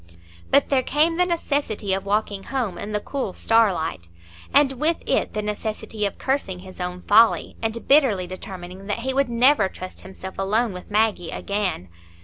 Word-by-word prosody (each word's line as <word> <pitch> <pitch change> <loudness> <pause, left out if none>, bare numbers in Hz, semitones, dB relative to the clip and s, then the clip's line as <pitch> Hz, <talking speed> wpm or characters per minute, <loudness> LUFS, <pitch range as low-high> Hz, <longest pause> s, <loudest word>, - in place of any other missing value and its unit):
But - - +4
there 270 -2 +3
came 310 +5 +2
the 360 0 +3
necessity 285 - -1
of 195 +1 -2
walking 205 -1 -1
home 235 -10 -2
in 205 - -5
the 210 - 0
cool 255 -3 -4
starlight, 190 - +1 0.4
and 280 -1 +5
with 325 +2 +1
it - - +1
the 210 - -2
necessity 210 0 -3
of 200 - -8
cursing 265 -9 -1
his 185 0 -10
own 180 0 -4
folly, 225 +2 +4
and 225 +1 -3
bitterly 260 -10 +4
determining 185 +1 -8
that 210 +2 -2
he 265 +2 -2
would 275 -1 +1
never 235 -3 +4
trust 185 0 -9
himself 190 0 -9
alone 215 +3 +1
with 180 - -9
Maggie 210 -5 +1
again. 200 - -2
210 Hz, 170 wpm, -23 LUFS, 190-260 Hz, 0.4 s, and